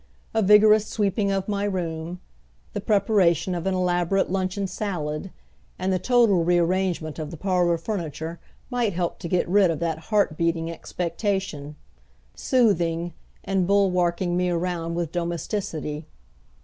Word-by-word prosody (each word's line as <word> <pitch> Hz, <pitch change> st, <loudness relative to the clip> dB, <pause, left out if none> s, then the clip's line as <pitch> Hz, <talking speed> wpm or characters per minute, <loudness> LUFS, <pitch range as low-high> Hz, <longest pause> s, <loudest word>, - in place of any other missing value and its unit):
A 225 Hz, -, +2 dB
vigorous 210 Hz, +1 st, +6 dB
sweeping 205 Hz, -1 st, 0 dB
of 195 Hz, -1 st, -1 dB
my 200 Hz, -1 st, -1 dB
room, 175 Hz, -3 st, -3 dB, 0.5 s
the 205 Hz, -, -3 dB
preparation 195 Hz, -5 st, +2 dB
of 175 Hz, +1 st, -3 dB
an 190 Hz, -, +1 dB
elaborate 180 Hz, +1 st, +1 dB
luncheon 190 Hz, +1 st, -1 dB
salad, 180 Hz, -5 st, -3 dB, 0.5 s
and 190 Hz, 0 st, 0 dB
the 185 Hz, -, +1 dB
total 225 Hz, -4 st, +3 dB
rearrangement 175 Hz, -2 st, +1 dB
of 155 Hz, -1 st, -4 dB
the 165 Hz, -, -8 dB
parlor 180 Hz, -1 st, +1 dB
furniture 165 Hz, -3 st, -4 dB, 0.3 s
might 240 Hz, -5 st, 0 dB
help 175 Hz, 0 st, -2 dB
to -, -, -5 dB
get 180 Hz, +1 st, +1 dB
rid 190 Hz, 0 st, +4 dB
of 165 Hz, -, -1 dB
that 165 Hz, -1 st, -2 dB
heart 205 Hz, -7 st, +2 dB
beating 165 Hz, 0 st, 0 dB
expectation 170 Hz, -4 st, -3 dB, 0.6 s
soothing, 175 Hz, -, +1 dB, 0.3 s
and 190 Hz, -2 st, 0 dB
bulwarking 180 Hz, -3 st, +2 dB
me 180 Hz, 0 st, +1 dB
around 170 Hz, -1 st, -2 dB
with 170 Hz, -2 st, -2 dB
domesticity. 170 Hz, -3 st, -3 dB
180 Hz, 135 wpm, -24 LUFS, 170-200 Hz, 0.6 s, vigorous